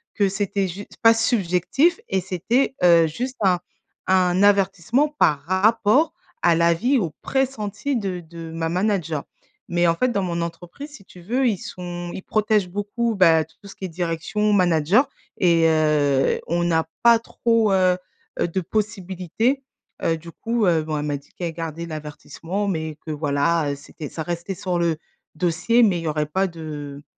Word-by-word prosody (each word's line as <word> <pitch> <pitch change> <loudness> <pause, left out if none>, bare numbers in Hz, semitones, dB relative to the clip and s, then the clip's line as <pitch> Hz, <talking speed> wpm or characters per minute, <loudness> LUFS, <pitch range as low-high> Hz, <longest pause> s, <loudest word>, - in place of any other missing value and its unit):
que 200 -2 +2
c'était 200 0 -1
jus 190 +3 -7 0.2
pas 225 - +8
subjectif 225 - +1
et 190 -1 +1
c'était, 210 +10 0
heu, 170 -2 +6
juste 250 - -4
un 180 -2 +3 0.5
un 185 0 +3
avertissement 200 - +3
par 145 -2 +3
rapport 220 - +3 0.3
à 170 - +6
l'avis 170 +11 +3
au 170 -6 -2
pressenti 265 0 -1
de 195 -5 -3
de 165 0 -9
ma 165 0 -2
manager. 175 -5 -1 0.4
Mais 175 0 +2
en 165 - +3
fait, 255 +8 +1
dans 200 -4 0
mon 170 -2 -2
entreprise 175 - -7
si 205 -9 -13
tu 180 - -15
veux 250 +8 +1
ils 215 -4 +1
sont 175 -1 -7
ils - - -6
protègent 215 -3 +1
beaucoup, 205 +4 -2
bah, 165 -4 +5
tout 160 - -27
ce 195 - -10
qui 190 - -6
est - - -2
direction, 175 +5 -1
manager 180 - +3 0.3
et 170 -2 +4
heu, 150 -4 +2
on 175 +1 0
n'a 160 -1 +2 0.2
pas 235 -1 +7
trop, 230 -2 +1
heu 185 -1 +3 0.4
heu, - - +2
de 190 - -1
possibilité, 210 - -2 0.4
heu, 165 - +1
du 170 +1 -11
coup, 230 +1 -1
heu, 165 -3 +3
bon 155 -1 -3
elle 150 - -3
m'a 145 -1 -1
dit 140 +1 -19
qu'elle 170 -2 -3
gardait 165 0 -5
l'avertissement 160 +5 -5
mais 160 -5 -3
que - - -2
voilà, 145 +1 +1
heu, - - -3
c'était 145 +1 -9
ça 160 - -6
restait 175 +3 -4
sur 180 -1 -2
le 170 -2 +1 0.4
dossier 180 +8 +2
mais 195 -5 +3
il - - -6
n'y - - -3
aurait 150 0 0
pas 190 +5 0
de 150 -4 -8
180 Hz, 175 wpm, -22 LUFS, 165-210 Hz, 0.5 s, pas